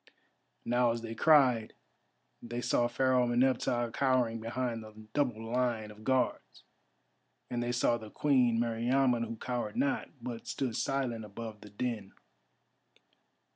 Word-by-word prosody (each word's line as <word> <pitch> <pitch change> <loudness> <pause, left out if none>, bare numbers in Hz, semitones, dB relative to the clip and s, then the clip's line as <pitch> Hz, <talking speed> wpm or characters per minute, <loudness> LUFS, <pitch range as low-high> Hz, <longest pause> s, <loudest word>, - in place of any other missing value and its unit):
Now 120 0 +3
as 115 0 -4
they 115 0 -5
cried 130 -6 +4 0.7
they 120 +1 -5
saw 120 0 +2
Pharaoh 125 +1 +2
Meneptah 120 -1 +1
cowering 125 -4 +1
behind 115 0 -2
the 110 0 -12
double 125 -6 0
line 120 -4 0
of 105 +1 -14
Guards, 130 +1 -1 0.9
and 120 -1 -1
they 120 0 -1
saw 120 -1 +2
the 110 -1 -9
Queen 125 -3 +2
Meriamun 120 +1 +2
who 115 - -5
cowered 120 -2 -3
not, 140 - 0
but 120 -1 -6
stood 125 -5 -2
silent 130 -5 -1
above 110 +1 -8
the 105 - -11
din. 105 -1 -4
120 Hz, 135 wpm, -31 LUFS, 115-125 Hz, 0.9 s, cried